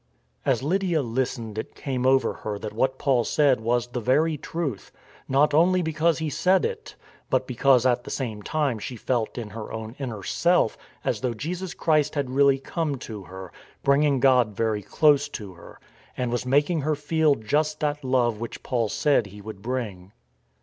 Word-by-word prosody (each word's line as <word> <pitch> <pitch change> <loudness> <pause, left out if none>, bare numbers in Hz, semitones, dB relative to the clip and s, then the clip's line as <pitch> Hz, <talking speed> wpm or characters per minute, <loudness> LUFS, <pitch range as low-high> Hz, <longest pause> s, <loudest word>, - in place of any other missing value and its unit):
As 130 -2 +2
Lydia 175 -1 +1
listened 115 -2 -3
it - - -7
came 130 -2 -2
over 135 0 +3
her 105 -1 -5
that 105 +1 -6
what 130 +4 0
Paul 130 -4 +2
said 140 +1 +3
was 120 +1 +1
the 125 0 -5
very 150 +7 +2
truth; 150 - -4 0.4
not 140 +3 +3
only 180 +4 +4
because 160 +1 +1
he 160 - -2
said 185 +5 +2
it, 455 -1 -5 0.3
but - - +1
because 130 0 +3
at 120 -1 +2
the - - -9
same 110 -6 -4
time 140 -2 -1
she 125 - -6
felt 120 -1 -2
in 110 -4 -5
her 110 +1 -7
own 110 +1 -6
inner 115 -7 -5
self 175 - +2 0.3
as - - -1
though 125 -3 -1
Jesus 175 +7 -4
Christ 155 -3 +1
had 140 -3 -1
really 140 0 +4
come 150 +2 -2
to 110 -6 -8
her, 95 -1 -9 0.3
bringing 140 0 +3
God 125 -5 +4
very 110 -2 0
close 145 - +3
to 105 -8 -7
her, 85 0 -14 0.4
and 125 -2 -1
was 120 +1 -2
making 145 +5 +2
her 155 +2 0
feel 150 0 +2
just 150 +8 -1
that 150 -1 -1
love 125 -4 +1
which 115 0 -7
Paul 120 -4 0
said 140 -2 +2
He 100 +1 -12
would 105 -1 -9
bring. 105 -6 -4
130 Hz, 185 wpm, -25 LUFS, 115-150 Hz, 0.4 s, only